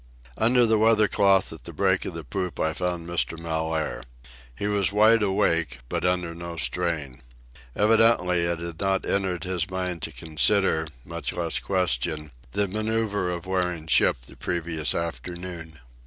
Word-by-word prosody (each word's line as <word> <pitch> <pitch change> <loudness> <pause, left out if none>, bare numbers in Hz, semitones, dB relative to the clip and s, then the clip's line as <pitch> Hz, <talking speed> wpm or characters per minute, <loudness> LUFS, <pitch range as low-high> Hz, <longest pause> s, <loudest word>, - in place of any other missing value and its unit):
Under 120 +2 +4
the 110 -1 +3
weather 110 -1 +5
cloth 95 -4 +3
at 80 - -12
the 85 - -6
break 95 +3 +1
of 90 - -5
the 80 - -6
poop 90 +6 -4
I 80 0 +1
found 90 0 -3
Mr. 85 -1 0
Mellaire. 80 -4 -2 0.5
He 100 - -4
was 100 -2 +1
wide 110 +2 +5
awake, 85 - +1
but - - -2
under 90 -2 0
no 85 0 -7
strain. 80 -6 -1 0.5
Evidently 110 -5 +4
it 85 0 0
had 85 0 -7
not 95 -1 +1
entered 95 -3 0
his 90 -1 -2
mind 90 -2 -3
to - - -3
consider, 80 +1 +1 0.2
much 85 0 -4
less 85 -2 -1
question, 75 -4 -1 0.2
the 105 -1 +1
manoeuvre 110 -2 -1
of 85 -1 -5
wearing 90 -3 -1
ship 75 -5 +3
the - - -11
previous 80 -3 -1
afternoon. 85 -1 -5
90 Hz, 155 wpm, -25 LUFS, 80-100 Hz, 0.5 s, weather